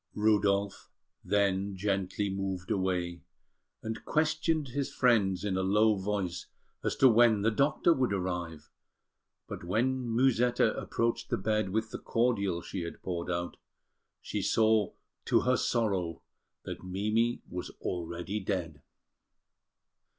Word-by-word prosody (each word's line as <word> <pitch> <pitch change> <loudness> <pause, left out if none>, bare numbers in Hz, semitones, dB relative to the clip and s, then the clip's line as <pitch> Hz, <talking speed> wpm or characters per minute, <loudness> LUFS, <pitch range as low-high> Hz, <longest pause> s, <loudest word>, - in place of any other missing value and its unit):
Rudolf 100 -2 +1 0.3
then 100 0 +1
gently 100 +1 -1
moved 95 -2 -3
away, 90 -2 -1 0.6
and 110 0 -5
questioned 155 -1 0
his 140 +2 -2
friends 105 -7 +2
in 100 -2 -1
a - - +1
low 105 +3 +4
voice 95 -3 -3 0.4
as - - 0
to 135 - +6
when 115 -3 +5
the 115 - +3
doctor 145 +8 +3
would 130 -7 0
arrive; 90 -5 -3 0.8
but - - -7
when 120 +7 0
Musetta 120 -1 +3
approached 115 0 -1
the - - 0
bed 110 0 0
with 110 +3 -1
the - - -5
cordial 100 -7 0
she 95 - -5
had 85 -1 -7
poured 85 -1 -3
out, 85 0 -3 0.6
she - - -4
saw 110 -3 +3 0.3
to - - +3
her 130 0 +2
sorrow 100 -11 -1 0.4
that - - -7
Mimi 110 +6 0
was 90 0 -5
already 85 +3 -3
dead. 90 -7 -3
100 Hz, 130 wpm, -30 LUFS, 95-115 Hz, 0.8 s, to